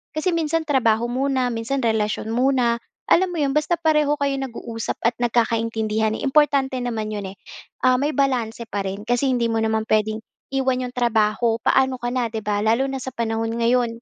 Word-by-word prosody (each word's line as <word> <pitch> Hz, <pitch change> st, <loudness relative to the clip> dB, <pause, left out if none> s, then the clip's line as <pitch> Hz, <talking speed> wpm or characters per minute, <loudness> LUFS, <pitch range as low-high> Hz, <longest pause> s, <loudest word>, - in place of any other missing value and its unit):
Kasi 325 Hz, +3 st, 0 dB
minsan 325 Hz, 0 st, 0 dB
trabaho 235 Hz, -6 st, +2 dB
muna, 255 Hz, 0 st, 0 dB
minsan 230 Hz, +5 st, -2 dB
relasyon 220 Hz, 0 st, 0 dB
muna, 245 Hz, -2 st, +2 dB, 0.3 s
alam 370 Hz, +2 st, +4 dB
mo 340 Hz, -, -4 dB
'yon? 275 Hz, -1 st, +1 dB
Basta 305 Hz, +3 st, +1 dB
pareho 300 Hz, -2 st, +2 dB
kayo 280 Hz, -1 st, 0 dB
nag-uusap 230 Hz, -3 st, -5 dB
at 230 Hz, 0 st, +2 dB
nagkakaintindihan, 225 Hz, -2 st, 0 dB
importante 275 Hz, -2 st, +2 dB
naman 225 Hz, -3 st, -3 dB
'yon, 200 Hz, -2 st, -4 dB
eh. 195 Hz, -, -25 dB, 0.4 s
Ah, 255 Hz, 0 st, +4 dB
may 285 Hz, +3 st, 0 dB
balanse 245 Hz, -5 st, 0 dB
pa 200 Hz, -1 st, -2 dB
rin 195 Hz, +1 st, -4 dB
kasi 245 Hz, +3 st, +1 dB
hindi 245 Hz, -2 st, +1 dB
mo 225 Hz, -, 0 dB
naman 220 Hz, 0 st, 0 dB
puwedeng 215 Hz, 0 st, +1 dB, 0.4 s
iwan 260 Hz, -1 st, +1 dB
'yong 250 Hz, -, -7 dB
trabaho. 225 Hz, -1 st, +2 dB
Paano 265 Hz, +1 st, +2 dB
ka 240 Hz, -, -1 dB
na, 245 Hz, -2 st, 0 dB
'di 220 Hz, 0 st, -4 dB
ba, 205 Hz, -1 st, 0 dB
lalo 225 Hz, +5 st, +2 dB
na 270 Hz, -, -3 dB
sa 260 Hz, -, -4 dB
panahon 225 Hz, -1 st, -2 dB
ngayon? 235 Hz, 0 st, +1 dB
240 Hz, 185 wpm, -22 LUFS, 225-270 Hz, 0.4 s, alam